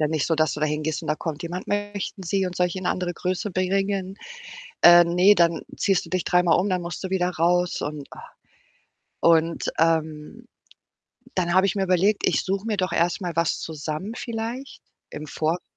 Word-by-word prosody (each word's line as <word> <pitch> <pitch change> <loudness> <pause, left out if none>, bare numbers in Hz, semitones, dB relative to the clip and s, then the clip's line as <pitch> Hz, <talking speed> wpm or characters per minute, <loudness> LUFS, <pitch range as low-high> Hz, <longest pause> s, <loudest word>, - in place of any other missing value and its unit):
Ja 150 - +2
nicht 155 -2 -1
so, 165 - +1
dass 155 -3 +1
du 150 - -7
da 155 - +2
hingehst 150 0 -2
und - - -7
da 150 - +2
kommt 155 -2 -5
jemand: 175 +2 -6
„Möchten 205 -1 -3
Sie 195 +2 0
und 180 -1 -6
soll 180 - +3
ich 175 - -6
Ihnen 185 - -5
'ne - - +2
andere 180 -1 -2
Größe 185 +4 -2
bringen?” 195 +1 -1 0.7
Ähm, 175 0 +7
ne, 190 +3 +7
dann 170 -2 +2 0.2
ziehst 195 -2 +1
du - - -13
dich 185 -1 -1
dreimal 180 -1 +3
um, 190 - 0
dann 185 -1 0
musst 170 0 -6
du 190 - -3
wieder 180 -1 0
raus 175 +1 +1
und 145 -1 -5
ach. - - -12 0.9
Und, 165 0 +2
ähm, 160 +6 -1 0.9
dann 175 -2 0
habe 190 +1 +5
ich 195 - -1
mir 195 - -1
überlegt, 190 +3 +2
ich - - +2
suche 195 +2 -3
mir 215 -2 -1
doch 185 0 0
erstmal 175 +1 0
was 170 0 +1
zusammen 155 +5 -5
vielleicht 235 +4 -5 0.3
im 150 +1 -7
Vorfeld, 160 +4 -2
180 Hz, 200 wpm, -24 LUFS, 165-190 Hz, 0.9 s, Ähm